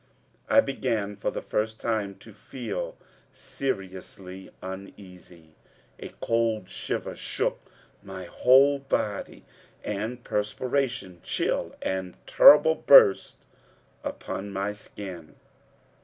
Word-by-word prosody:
I 280 - +7
began 110 - -2
for 100 - -2
the - - -5
first 110 +1 -2
time 105 -4 -2
to 110 - -15
feel - - -6 0.3
seriously 95 -5 -6
uneasy. 90 -3 -11 0.5
A - - -7
cold 115 -4 0
shiver - - -4
shook - - -2 0.4
my 95 - -8
whole 135 +8 +4
body, 110 -7 -3 0.4
and 110 +4 -4
perspiration, 110 -2 -2
chill - - -1
and 95 -1 -3
terrible, 160 +2 +8
burst 120 -10 +6 0.7
upon 100 +1 -5
my 100 +1 -2
skin. 95 -5 -9
105 Hz, 95 wpm, -26 LUFS, 95-125 Hz, 0.7 s, terrible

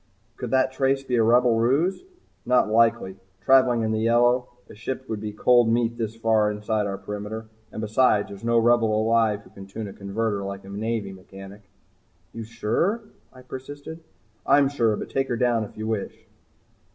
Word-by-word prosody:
"Could 125 - -6
that 130 +1 +2
trace 135 +1 0
be 125 -2 -2
a - - +4
Rebel 120 0 +4
ruse?" 145 +11 +1 0.4
"Not 125 -2 +3
likely 115 -4 +2 0.2
travelling 125 +1 +4
in 110 - -1
the 110 - 0
yellow. 120 +2 +3 0.2
A - - -13
ship 130 +4 -6
would 110 - -4
be 105 0 -5
cold 120 +2 +3
meat 120 0 0
this 110 -1 -3
far 110 -2 +2
inside 105 0 -2
our 100 -1 -4
perimeter. 105 +3 -7 0.2
And 110 - -6
besides, 110 -1 +2
there's 100 +1 -10
no 115 0 +2
Rebel 115 -2 +3
alive 110 -2 +2
who - - -19
can 95 0 -12
tune 105 +2 -6
a 100 - -9
converter 100 +1 -3
like 100 0 -6
a - - -11
Navy 105 -1 -3
mechanic." 95 +2 -12 0.7
"You 115 - -6
sure?" 120 - -1 0.3
I 130 0 -15
persisted. 145 +5 -9 0.4
"I'm 140 0 +4
sure. 115 -6 +1
But - - -7
take 135 0 0
her 120 - -2
down 120 -2 +1
if - - -15
you 110 - -5
wish." 110 -2 -4
115 Hz, 185 wpm, -24 LUFS, 105-125 Hz, 0.7 s, a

